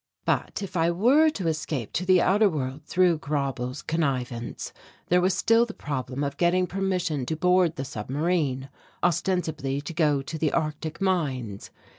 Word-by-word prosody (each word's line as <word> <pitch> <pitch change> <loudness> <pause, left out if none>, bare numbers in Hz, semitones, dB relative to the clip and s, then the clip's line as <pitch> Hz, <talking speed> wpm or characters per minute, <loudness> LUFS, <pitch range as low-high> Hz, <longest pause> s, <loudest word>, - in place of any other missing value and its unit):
But, - - -1
if 195 - -7
I 165 0 +3
were 250 - +4
to 195 - -3
escape 155 -7 -2
to 180 - -2
the 185 -1 +5
outer 205 +2 +4
world 140 -3 -3
through 175 -2 +3
Grauble's 135 -4 -3
connivance, 130 -7 -2 0.4
there 180 +1 +4
was 185 +1 +2
still 230 +3 +4
the 235 - -5
problem 140 -1 -4
of 140 0 -3
getting 180 +1 +3
permission 180 -7 -1
to 160 - -1
board 180 0 +3
the 135 - -4
submarine, 135 +2 -1 0.3
ostensibly 160 -6 0
to 145 +3 -7
go 150 -4 +2
to 160 +2 -6
the 155 -2 +1
Arctic 155 +2 -2
mines. 135 - -1
160 Hz, 160 wpm, -26 LUFS, 140-180 Hz, 0.4 s, the